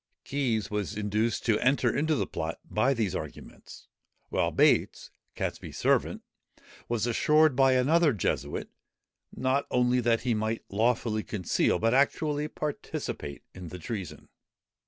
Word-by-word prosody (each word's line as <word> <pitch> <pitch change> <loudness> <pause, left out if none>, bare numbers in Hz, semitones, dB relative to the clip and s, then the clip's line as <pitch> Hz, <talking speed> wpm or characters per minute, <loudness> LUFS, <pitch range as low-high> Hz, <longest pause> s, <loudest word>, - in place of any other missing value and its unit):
Keys 125 -8 -1
was 105 0 -3
induced 105 +2 -1
to 110 -3 +3
enter 130 +3 +2
into 155 +2 +1
the - - 0
plot 80 +1 -4
by 135 +6 +1
these 105 -6 -1
arguments; - - -9 0.4
while - - +1
Bates, - - +2 0.2
Catesby's - - -4
servant, - - +1 0.7
was 115 -2 0
assured 150 +4 +3
by 135 0 +5
another 150 +5 +4
Jesuit, 75 - -2 0.6
not 130 +2 0
only 125 0 +2
that 115 -1 +2
he 125 -2 0
might 110 +1 -2
lawfully 110 +1 +1
conceal, 105 -6 0
but 115 +4 +1
actually 145 +2 +1
participate 145 - -5
in 90 -1 -9
the 90 - -7
treason. 95 +1 -6
115 Hz, 135 wpm, -28 LUFS, 105-135 Hz, 0.7 s, by